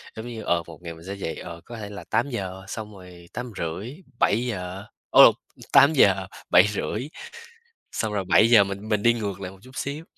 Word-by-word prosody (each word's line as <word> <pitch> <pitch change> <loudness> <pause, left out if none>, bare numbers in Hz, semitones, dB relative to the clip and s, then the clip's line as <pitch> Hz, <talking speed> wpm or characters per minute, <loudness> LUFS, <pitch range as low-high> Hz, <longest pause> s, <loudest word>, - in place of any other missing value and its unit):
giống 110 +2 -7
như, 115 -2 -6
ờ, 85 -1 +1
một 85 0 -12
ngày 85 -1 -6
mình 80 +2 -14
sẽ 100 - -4
dậy, 90 -5 -4
ờ, 85 -1 -9
có 120 - -9
thể 105 -2 -7
là 105 0 -8
8 120 +5 0
giờ, 95 -5 -5
xong 105 0 -7
rồi 90 -2 -14
8 120 +1 -5
rưỡi, 95 - -4 0.2
7 115 +4 +2
giờ 95 -3 -5 0.2
ô, - - +9
t - - -23 0.4
tám 140 +2 +7
giờ, 95 -8 +4 0.2
7 - - +7
rưỡi. 105 +5 -3 0.8
Xong 110 -1 -2
rồi 100 -2 -1
7 105 +5 +5
giờ 110 -4 +7
mình 100 +2 -6
mình 105 -2 +1
đi 120 +1 +5
ngược 100 -5 -4
lại 95 -1 -6
một 95 - -16
chút 130 +1 -15
xíu. 145 +4 -4
100 Hz, 225 wpm, -24 LUFS, 95-115 Hz, 0.8 s, ô